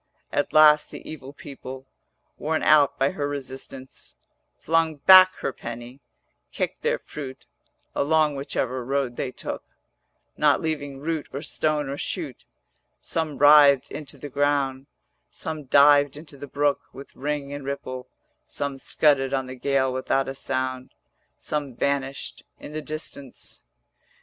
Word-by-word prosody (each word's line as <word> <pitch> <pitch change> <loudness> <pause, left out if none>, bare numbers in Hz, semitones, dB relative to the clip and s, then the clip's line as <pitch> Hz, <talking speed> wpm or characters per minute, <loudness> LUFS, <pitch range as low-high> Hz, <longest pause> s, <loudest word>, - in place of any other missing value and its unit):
At 145 - 0
last 150 -1 +6
the - - -10
evil 140 -4 -8
people, 135 -2 -9 0.5
Worn 160 +1 -1
out 145 -2 +5
by 135 +1 +2
her 145 -6 -2
resistance, 135 -1 -8 0.4
Flung 165 -1 +1
back 185 +5 +8
her 135 - -2
penny, 120 +3 -8 0.5
kicked - - -3
their - - +1
fruit 135 -3 -9 0.5
Along 155 0 +2
whichever 130 -2 -2
road 135 -1 -1
they 130 - -2
took, - - -5 0.8
440 - - -16
Not 150 -1 +5
leaving 145 -4 -3
root 160 0 -3
or 140 +3 -5
stone 155 -2 0
or 140 +1 -5
shoot; - - -4 0.5
Some 160 -3 -2
writhed 145 -2 +7
into 150 -3 -7
the 145 - -8
ground, 140 -1 0 0.4
Some 155 - -6
dived 145 +1 +5
into 150 -1 -11
the 140 +1 -9
brook 145 +1 +1
With 135 +1 -12
ring 145 0 -3
and 145 -1 -6
ripple, 130 -2 -5 0.4
Some 140 -1 -4
scudded 140 -2 +2
on 135 -1 -1
the 130 - -7
gale 130 0 0
without 130 +1 0
a 135 - -3
sound, 130 -1 -3 0.4
Some 145 - -3
vanished 140 +1 -2 0.2
in 150 - -9
the 155 - -3
distance. 150 -3 -6
140 Hz, 140 wpm, -25 LUFS, 135-150 Hz, 0.8 s, back